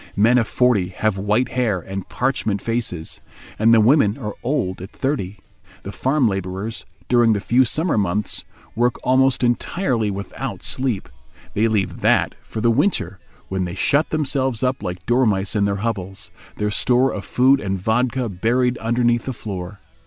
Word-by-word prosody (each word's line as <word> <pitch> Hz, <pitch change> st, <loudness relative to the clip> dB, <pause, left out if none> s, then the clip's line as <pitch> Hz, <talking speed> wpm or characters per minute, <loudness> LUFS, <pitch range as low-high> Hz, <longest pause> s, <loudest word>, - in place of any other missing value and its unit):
Men 115 Hz, +5 st, +4 dB
of 115 Hz, -, 0 dB
forty 120 Hz, -8 st, +2 dB
have 110 Hz, +2 st, -1 dB
white 105 Hz, +6 st, +1 dB
hair 115 Hz, -7 st, 0 dB
and 95 Hz, +2 st, -7 dB
parchment 125 Hz, -5 st, -1 dB
faces; 110 Hz, -8 st, -3 dB, 0.4 s
and 110 Hz, +2 st, +5 dB
the 115 Hz, -, +7 dB
women 110 Hz, -2 st, +4 dB
are 105 Hz, -6 st, -5 dB
old 105 Hz, -9 st, -1 dB
at 95 Hz, -, -7 dB
thirty. 110 Hz, -8 st, -3 dB, 0.5 s
The 100 Hz, -, -6 dB
farm 130 Hz, +3 st, +1 dB
labourers, 95 Hz, +2 st, -4 dB, 0.2 s
during 120 Hz, -2 st, +4 dB
the 105 Hz, -, 0 dB
few 125 Hz, +6 st, +3 dB
summer 155 Hz, 0 st, +1 dB
months, 100 Hz, +1 st, -1 dB, 0.3 s
work 120 Hz, +2 st, +2 dB
almost 130 Hz, 0 st, +3 dB
entirely 120 Hz, -, 0 dB
without 100 Hz, 0 st, -5 dB
sleep. 130 Hz, -7 st, 0 dB, 0.5 s
They 110 Hz, +2 st, +2 dB
leave 105 Hz, -4 st, -1 dB
that -, -, +3 dB
for 110 Hz, -, -6 dB
the 115 Hz, +1 st, +3 dB
winter, 130 Hz, -, 0 dB, 0.3 s
when 95 Hz, -1 st, -2 dB
they 90 Hz, +1 st, -5 dB
shut 145 Hz, -, +2 dB
themselves 135 Hz, -6 st, -1 dB
up 125 Hz, -2 st, 0 dB
like 90 Hz, -2 st, -5 dB
dormice 110 Hz, -5 st, +1 dB
in 100 Hz, -1 st, +2 dB
their 100 Hz, 0 st, -1 dB
hovels, 95 Hz, -4 st, -4 dB, 0.3 s
their 105 Hz, 0 st, -1 dB
store 125 Hz, +4 st, +2 dB
of 100 Hz, -, -5 dB
food 130 Hz, +7 st, +3 dB
and 95 Hz, -4 st, -2 dB
vodka 120 Hz, +5 st, 0 dB
buried 120 Hz, +6 st, 0 dB
underneath 120 Hz, +1 st, +1 dB
the 130 Hz, -, -3 dB
floor. 100 Hz, -3 st, -7 dB
115 Hz, 165 wpm, -21 LUFS, 100-125 Hz, 0.5 s, the